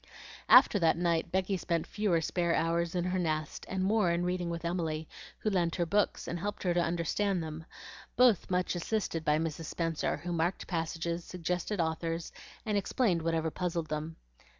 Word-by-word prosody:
After 205 - +8
that 165 -1 +3
night 170 -1 0
Becky 190 +1 0
spent 170 -2 -1
fewer 200 -6 +1
spare 170 +1 0
hours 170 +1 0
in 175 - +1
her 180 +1 0
nest, 155 -3 -2
and 190 0 -1
more 205 -1 +3
in 170 +1 +1
reading 180 -1 -1
with 170 0 -4
Emily, 160 -3 -2 0.3
who 215 - -1
lent 175 -3 +1
her 175 - 0
books 205 +5 0
and 170 - -3
helped 205 +4 -4
her 180 -2 +2
to 175 - +2
understand 175 +2 0
them, 160 0 -7 0.5
both 245 -6 +4
much 180 0 +1
assisted 175 -2 -2
by 150 -1 +3
Mrs. 160 0 -3
Spenser, 165 0 -1
who 175 0 -4
marked 170 +3 0
passages, 170 0 -2
suggested 180 +3 -3
authors, 165 0 -2 0.3
and 210 -2 +1
explained 195 -4 +1
whatever 165 -1 0
puzzled 170 -2 -2
them. 155 +1 -3
170 Hz, 175 wpm, -31 LUFS, 165-185 Hz, 0.5 s, After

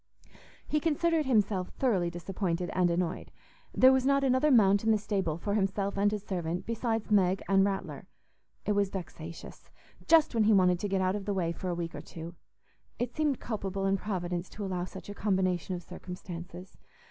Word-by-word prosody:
He 305 - +1
considered 325 0 +1
himself 205 -6 +2
thoroughly 195 -10 +1
disappointed 175 0 -3
and 180 -1 +3
annoyed. 170 0 -2 0.4
There 260 +1 +6
was 265 -1 +2
not 275 +1 +3
another 260 +3 +3
mount 205 -6 +5
in 225 - +1
the 220 - +5
stable 195 -6 -2
for 200 +4 -2
himself 200 -1 0
and 205 +1 +2
his 210 -2 -3
servant 175 -3 -3
besides 225 -1 -2
Meg 190 -2 +3
and 195 0 +4
Rattler. 195 -1 -3 0.6
It - - +1
was 200 -1 +2
vexatious; 165 -3 -8 0.4
just 320 -3 +5
when 225 -2 +3
he 220 - +5
wanted 180 -3 +4
to 205 - -2
get 190 0 +1
out 185 +1 +1
of 205 -2 -5
the 205 -1 -1
way 170 -3 0
for 180 +2 -5
a 175 - -1
week 170 -1 -4
or - - -6
two. 165 +1 -9 0.6
It 245 0 -3
seemed 300 -4 +1
culpable 195 -4 -3
in 195 0 +3
Providence 180 -3 -3
to 205 - -6
allow 180 -2 -2
such 190 - -10
a 205 - -6
combination 185 -3 0
of 175 - -7
circumstances. 180 0 -9
195 Hz, 190 wpm, -30 LUFS, 180-215 Hz, 0.6 s, There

